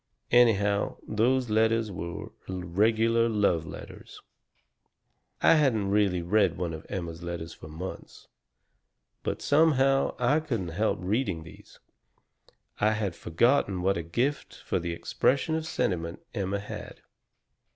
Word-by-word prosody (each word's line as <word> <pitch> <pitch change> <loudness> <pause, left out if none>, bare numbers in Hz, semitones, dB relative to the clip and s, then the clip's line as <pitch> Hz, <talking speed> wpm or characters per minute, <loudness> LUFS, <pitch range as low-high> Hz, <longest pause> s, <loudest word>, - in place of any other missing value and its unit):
Anyhow, 105 -4 +3
those 120 +2 +1
letters 110 0 +2
were 85 -2 -6 0.2
regular 110 +6 +2
love 95 -7 +1
letters. - - -10 1.2
"I - - +7
hadn't 120 -11 +2
really 100 -4 +2
read 95 -1 +2
one 85 -2 -2
of 80 - -9
Emma's 85 -3 -5
letters 85 -1 -5
for 80 - -12
months. 80 +5 -8 0.9
But - - -3
somehow 135 -3 +3
I 125 +5 +3
couldn't 115 - -3
help 105 +7 0
reading 95 -4 -1
these. 80 - -15 1.0
I 105 +1 +3
had 105 -5 -2
forgotten 95 - +1
what 95 +1 +2
a 85 - -2
gift 120 - -2
for - - -1
the 85 0 -3
expression 130 - 0
of 160 0 -2
sentiment 85 - -2
Emma 100 -3 -1
had. 100 +1 -8
100 Hz, 125 wpm, -28 LUFS, 85-120 Hz, 1.2 s, I